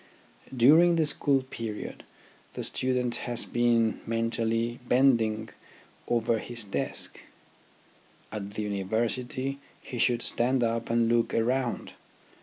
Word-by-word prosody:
During 160 Hz, +8 st, +6 dB
the 160 Hz, -1 st, +2 dB
school 140 Hz, -2 st, +2 dB
period 115 Hz, -4 st, -6 dB, 0.5 s
the -, -, -5 dB
student 125 Hz, -2 st, -1 dB, 0.2 s
has 120 Hz, -1 st, +1 dB
been 120 Hz, -2 st, +2 dB
mentally 115 Hz, +1 st, -1 dB
bending 115 Hz, -4 st, +3 dB, 0.6 s
over 115 Hz, -1 st, +1 dB
his 120 Hz, +1 st, -4 dB
desk; 100 Hz, -, -3 dB, 1.1 s
at 100 Hz, -1 st, -6 dB
the 110 Hz, -, -2 dB
University 120 Hz, +7 st, -2 dB, 0.2 s
he 125 Hz, -, -7 dB
should 120 Hz, -1 st, +2 dB
stand 125 Hz, +1 st, +1 dB
up 115 Hz, 0 st, -1 dB
and 115 Hz, 0 st, +2 dB
look 115 Hz, 0 st, +1 dB
around. 125 Hz, +2 st, 0 dB
120 Hz, 110 wpm, -28 LUFS, 115-125 Hz, 1.1 s, During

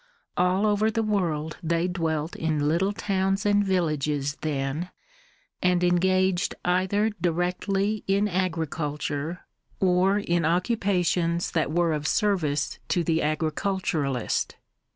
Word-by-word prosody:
All 180 Hz, +3 st, +2 dB
over 210 Hz, +1 st, +2 dB
the 225 Hz, 0 st, 0 dB
world 165 Hz, -7 st, -1 dB
they 170 Hz, +1 st, 0 dB
dwelt 160 Hz, -3 st, -2 dB
in 155 Hz, -2 st, 0 dB
little 175 Hz, +6 st, +2 dB
towns 195 Hz, -1 st, -1 dB
and 205 Hz, 0 st, +4 dB
villages 150 Hz, -6 st, 0 dB
then, 150 Hz, +3 st, -2 dB, 0.7 s
and 180 Hz, -1 st, +2 dB
engaged 185 Hz, +1 st, +2 dB
either 190 Hz, +4 st, +2 dB
directly 185 Hz, +4 st, 0 dB
in 200 Hz, +2 st, +2 dB
agriculture, 160 Hz, -3 st, -2 dB, 0.4 s
or 185 Hz, +1 st, +3 dB
in 175 Hz, -4 st, 0 dB
occupations 175 Hz, -1 st, +1 dB
that 160 Hz, -2 st, 0 dB
were 170 Hz, 0 st, +2 dB
of 150 Hz, 0 st, -2 dB
service 155 Hz, -9 st, 0 dB
to 175 Hz, -, +1 dB
the 165 Hz, 0 st, +1 dB
agriculturist. 155 Hz, -, -1 dB
175 Hz, 110 wpm, -26 LUFS, 155-195 Hz, 0.7 s, and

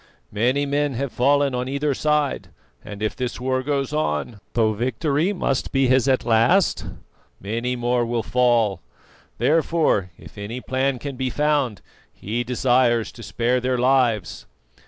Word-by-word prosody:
Many 125 Hz, +7 st, +1 dB
men 145 Hz, -1 st, 0 dB
have 135 Hz, +1 st, -3 dB
fallen 140 Hz, +2 st, +2 dB
on 125 Hz, 0 st, -2 dB
either 140 Hz, +1 st, 0 dB
side, 150 Hz, 0 st, 0 dB, 0.4 s
and 105 Hz, +1 st, -8 dB
if 110 Hz, -, -1 dB
this 125 Hz, -2 st, -4 dB
war 130 Hz, +1 st, 0 dB
goes 140 Hz, +1 st, -2 dB
on, 105 Hz, -, -2 dB
though 110 Hz, -2 st, +2 dB
victory 140 Hz, -, 0 dB
must 140 Hz, -9 st, -1 dB
be 135 Hz, -1 st, +2 dB
his 130 Hz, 0 st, +3 dB
at 130 Hz, -1 st, +2 dB
last, 120 Hz, -, +3 dB, 0.5 s
many 115 Hz, +5 st, -2 dB
more 120 Hz, 0 st, 0 dB
will 115 Hz, -1 st, -1 dB
fall. 120 Hz, -7 st, +2 dB, 0.6 s
Therefore, 155 Hz, -, +2 dB
if -, -, -13 dB
any 110 Hz, +5 st, -5 dB
plan 130 Hz, +1 st, -1 dB
can 140 Hz, +1 st, -6 dB
be 130 Hz, 0 st, -1 dB
found, 140 Hz, -, 0 dB, 0.3 s
he 115 Hz, +4 st, -4 dB
desires 120 Hz, -2 st, +2 dB
to 115 Hz, -, -13 dB
spare 115 Hz, +4 st, 0 dB
their 125 Hz, 0 st, -1 dB
lives." 120 Hz, -6 st, +1 dB
125 Hz, 150 wpm, -22 LUFS, 115-140 Hz, 0.6 s, his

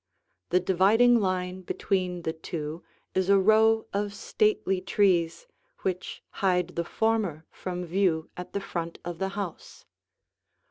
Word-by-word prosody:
The 180 Hz, -, +4 dB
dividing 205 Hz, +7 st, +4 dB
line 185 Hz, -2 st, -1 dB
between 180 Hz, -1 st, -2 dB
the 160 Hz, -, -1 dB
two 160 Hz, 0 st, -6 dB, 0.3 s
is 190 Hz, 0 st, +1 dB
a 200 Hz, -, +7 dB
row 220 Hz, +3 st, +4 dB
of 205 Hz, 0 st, -2 dB
stately 205 Hz, -3 st, +1 dB
trees 185 Hz, -, +2 dB, 0.4 s
which 185 Hz, -1 st, -3 dB, 0.2 s
hide 180 Hz, -2 st, +2 dB
the 170 Hz, -1 st, -2 dB
former 200 Hz, -6 st, 0 dB
from 180 Hz, -1 st, -5 dB
view 170 Hz, -2 st, +1 dB
at 180 Hz, -, -8 dB
the 200 Hz, -, -1 dB
front 170 Hz, -3 st, -4 dB
of 175 Hz, -1 st, -5 dB
the 190 Hz, -, -1 dB
house. 195 Hz, -5 st, -6 dB
185 Hz, 135 wpm, -27 LUFS, 175-200 Hz, 0.4 s, a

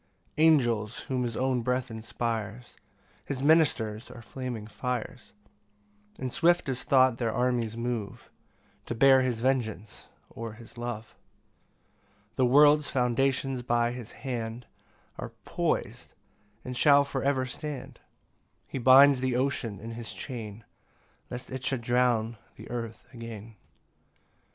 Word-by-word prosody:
3 155 Hz, -, +4 dB
Angels, 120 Hz, -9 st, +2 dB
whom 130 Hz, -1 st, -2 dB
his 120 Hz, -2 st, -2 dB
own 130 Hz, -1 st, +1 dB
breath 125 Hz, +1 st, -1 dB
inspires, 115 Hz, 0 st, -4 dB, 0.5 s
His 135 Hz, -1 st, -4 dB
ministers 135 Hz, -8 st, +2 dB
are 115 Hz, -, -11 dB
flaming 125 Hz, -3 st, -5 dB
fires; 125 Hz, +2 st, -5 dB, 0.9 s
And 130 Hz, -2 st, -4 dB
swift 175 Hz, -1 st, +3 dB
as 125 Hz, -1 st, -2 dB
thought 130 Hz, -3 st, +4 dB
their 115 Hz, -2 st, 0 dB
armies 120 Hz, -2 st, 0 dB
move 115 Hz, -4 st, -4 dB, 0.6 s
To 120 Hz, -, -3 dB
bear 135 Hz, +2 st, +6 dB
his 125 Hz, -3 st, -1 dB
vengeance, 115 Hz, -5 st, -2 dB, 0.2 s
or 115 Hz, -1 st, -7 dB
his 115 Hz, +2 st, -14 dB
love. 120 Hz, -2 st, -5 dB, 1.2 s
4 -, -, -43 dB
The 130 Hz, -, +4 dB
world's 145 Hz, +3 st, +6 dB
foundations 130 Hz, +1 st, +1 dB
by 120 Hz, -1 st, +1 dB
his 120 Hz, -2 st, -8 dB
hand 120 Hz, -2 st, -4 dB, 0.5 s
Are -, -, -6 dB
pois'd, -, -, -2 dB, 0.5 s
and 125 Hz, 0 st, -5 dB
shall 140 Hz, +2 st, +6 dB
for 140 Hz, -1 st, -3 dB
ever 135 Hz, -2 st, +1 dB
stand; 135 Hz, 0 st, -7 dB, 0.7 s
He 135 Hz, -, -5 dB
binds 130 Hz, +2 st, +7 dB
the 130 Hz, -2 st, 0 dB
ocean 125 Hz, -6 st, -1 dB
in 115 Hz, +2 st, -7 dB
his 115 Hz, 0 st, -7 dB
chain, 115 Hz, -4 st, -7 dB, 0.7 s
Lest 125 Hz, +1 st, -7 dB
it 130 Hz, 0 st, -5 dB
should 130 Hz, -1 st, -1 dB
drown 120 Hz, -2 st, +1 dB, 0.2 s
the -, -, -11 dB
earth 115 Hz, -2 st, -5 dB
again. 115 Hz, -2 st, -9 dB
125 Hz, 130 wpm, -28 LUFS, 115-130 Hz, 1.2 s, binds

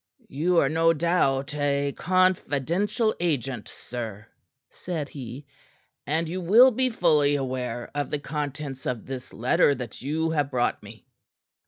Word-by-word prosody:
"You 170 Hz, +6 st, +1 dB
are 140 Hz, -, +5 dB
no 165 Hz, +3 st, +3 dB
doubt 150 Hz, -5 st, +1 dB
a 140 Hz, -1 st, 0 dB
confidential 185 Hz, -, +1 dB
agent, 135 Hz, -9 st, -1 dB
sir," 110 Hz, -4 st, -7 dB, 0.5 s
said 160 Hz, -5 st, -5 dB
he. 130 Hz, 0 st, -8 dB, 0.6 s
"And 160 Hz, +3 st, 0 dB
you 185 Hz, +3 st, -4 dB
will 230 Hz, +9 st, +7 dB
be 255 Hz, +2 st, +1 dB
fully 155 Hz, -9 st, +3 dB
aware 125 Hz, -3 st, -3 dB
of 145 Hz, 0 st, -2 dB
the -, -, -1 dB
contents 145 Hz, -2 st, -5 dB
of 120 Hz, -4 st, -3 dB
this 130 Hz, -1 st, -7 dB
letter 130 Hz, +4 st, +3 dB
that 125 Hz, -4 st, -7 dB
you 160 Hz, +5 st, -1 dB
have 145 Hz, -3 st, 0 dB
brought 125 Hz, -3 st, 0 dB
me." -, -, -13 dB
145 Hz, 140 wpm, -26 LUFS, 135-170 Hz, 0.6 s, will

